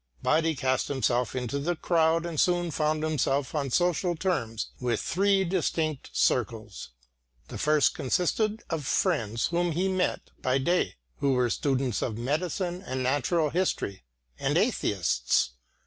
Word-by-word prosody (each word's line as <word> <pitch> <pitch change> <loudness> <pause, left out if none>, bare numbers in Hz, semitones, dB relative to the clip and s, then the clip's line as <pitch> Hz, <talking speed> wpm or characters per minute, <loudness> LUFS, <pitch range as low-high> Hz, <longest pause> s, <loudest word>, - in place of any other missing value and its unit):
But 160 +1 +3
he 160 -1 +1
cast 130 -2 0
himself 125 -3 0
into 130 +2 -2
the 175 +5 -1
crowd 165 0 +2
and 165 -3 -3
soon 175 -1 +2
found 155 +1 0
himself 140 -3 0
on 145 -3 -1
social 175 +4 +1
terms 125 - -2
with 120 -3 0
three 195 +2 +2
distinct 160 -4 -1
circles. - - -1 0.6
The - - -7
first 150 -1 +3
consisted 205 - 0
of 160 -3 -2
friends 120 - +1
whom 175 0 0
he 180 +4 +1
met 185 -1 -1
by 130 +1 +2
day, 175 +7 +1 0.2
who 140 -1 +2
were 125 -2 +2
students 130 -5 0
of 110 -3 -2
medicine 175 - -2
and 130 -8 -3
natural 145 +4 +1
history 170 - -1 0.4
and - - +1
atheists. 65 -10 +1
155 Hz, 145 wpm, -27 LUFS, 130-175 Hz, 0.6 s, But